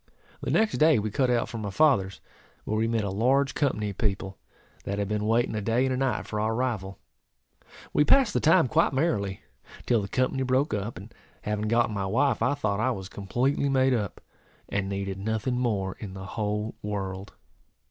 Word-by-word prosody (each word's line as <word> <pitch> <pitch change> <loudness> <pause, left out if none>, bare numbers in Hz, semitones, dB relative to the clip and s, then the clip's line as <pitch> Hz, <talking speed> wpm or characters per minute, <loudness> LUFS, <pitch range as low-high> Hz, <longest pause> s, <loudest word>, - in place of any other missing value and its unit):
The - - -3
next 220 -1 +2
day 155 0 +6
we 105 0 -2
cut 130 +4 +1
out 120 -1 +1
for 115 - -6
my 105 -2 -3
father's, 100 -6 +2 0.4
where 110 - -2
we 110 +1 +1
met 115 -2 0
a 100 - -2
large 130 +7 +2
company 110 -8 0
of 100 - -14
people, 100 -3 -2 0.4
that 100 - -3
had 100 -1 -1
been 105 0 -1
waiting 115 +2 +2
a 105 - -2
day 115 +5 +1
and 130 - 0
a - - -1
night 135 -1 0
for 105 - -4
our 110 +1 0
arrival. 110 -6 -2 1.0
We 150 - +4
passed 255 - +4
the - - +2
time 160 -2 +4
quite 160 +2 +2
merrily, 105 - -1 0.3
until 120 -3 +1
the 100 - -4
company 130 +4 0
broke 130 +2 +1
up; 105 +3 -3
and 105 +4 -11 0.3
having 105 0 -2
gotten 115 -1 +2
my 100 -2 -2
wife, 120 +4 +1
I 125 +5 +2
thought 105 -7 -1
I 125 +4 +2
was 95 -6 -4
completely 125 +8 0
made 130 -1 +3
up, 105 -6 -2 0.5
and 100 -1 -2
needed 100 -1 -3
nothing 110 +4 -1
more 100 -6 -1
in 100 -3 -7
the 95 0 -7
whole 105 +1 -2
world. 95 -2 -4
110 Hz, 200 wpm, -27 LUFS, 100-130 Hz, 1.0 s, day